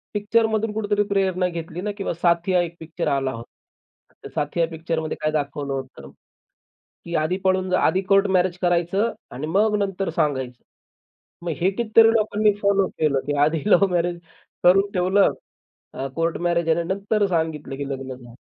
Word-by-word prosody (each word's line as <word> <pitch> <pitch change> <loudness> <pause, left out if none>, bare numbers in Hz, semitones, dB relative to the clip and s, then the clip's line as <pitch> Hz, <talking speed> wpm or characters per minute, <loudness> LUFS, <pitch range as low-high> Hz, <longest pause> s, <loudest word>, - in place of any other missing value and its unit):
पिक्चरमधून 220 +1 +1
कुठेतरी 205 -1 0
प्रेरणा 190 -2 +1
घेतली 170 0 -6
ना 210 - -2
किंवा 195 - -2
साथिया 170 +2 +2
एक 170 0 -7
पिक्चर 160 -1 -5
आला 135 -1 0
होता. 115 +1 -9 0.7
तर - - -8
साथिया 165 +3 0
पिक्चर 165 0 -3
मध्ये 155 -1 -4
काय 155 - 0
दाखवलं 145 -2 -2
होतं? 130 - -7 1.0
की 170 0 -4
आधी 160 +4 0
पळून 185 0 +2
जा, 185 - +3
आधी 190 - +2
कोर्ट 195 +1 +5
मॅरेज 180 0 0
करायचं 175 +5 +1 0.2
आणि 135 +5 -5
मग 210 +6 +2
नंतर 195 -2 -2
सांगायचं. 130 -4 -1 0.8
मग 170 - -1
हे 190 +3 +3
कितीतरी 225 +1 +4
लोकांनी 215 -1 +2
फॉलो 200 -1 +3
केलं, 150 -3 +2
की 145 0 -1
आधी 155 -1 -1
लव्ह 195 +2 +6
मॅरेज 175 0 0 0.4
करून 195 +3 +5
ठेवलं. 185 +2 +3 0.6
अ, 135 - -4
कोर्ट 165 0 0
मॅरेज 170 -1 0
आहे. 160 - +3
आणि 170 - -3
नंतर 205 +1 0
सांगितलं, 160 -5 -2
की 140 0 -5
लग्न 135 -1 -5
झालं. 120 -2 -14
175 Hz, 170 wpm, -23 LUFS, 155-195 Hz, 1.0 s, लव्ह